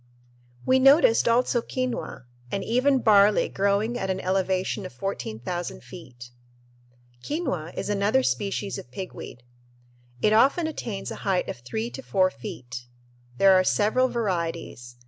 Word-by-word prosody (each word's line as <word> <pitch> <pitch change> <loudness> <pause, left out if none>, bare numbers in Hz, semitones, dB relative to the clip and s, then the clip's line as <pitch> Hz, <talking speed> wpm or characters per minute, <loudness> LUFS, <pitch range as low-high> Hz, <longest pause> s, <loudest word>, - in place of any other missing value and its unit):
We 260 0 +4
noticed 270 -3 +5
also 240 +1 +2
quinoa 255 - -4 0.3
and 195 - -2
even 255 +3 +2
barley 205 -1 +5
growing 200 +4 0
at 190 - -3
an 190 0 -1
elevation 190 +1 -1
of 185 - -7
14,000 175 - -5
feet. 125 -9 -12 0.9
Quinoa 185 - -3
is - - -3
another 200 -8 +1
species 195 +10 -2
of - - -12
pigweed. 125 -5 -8 0.8
It 215 - +3
often 275 +9 +4
attains 230 -10 -5
a - - -6
height 190 -2 0
of - - -5
three 220 - -4
to - - -7
four 185 -6 +1
feet. 120 -1 -8 0.5
There 195 +5 +6
are 185 0 +5
several 220 +7 +2
varieties. 170 - -3
195 Hz, 135 wpm, -25 LUFS, 170-230 Hz, 0.9 s, There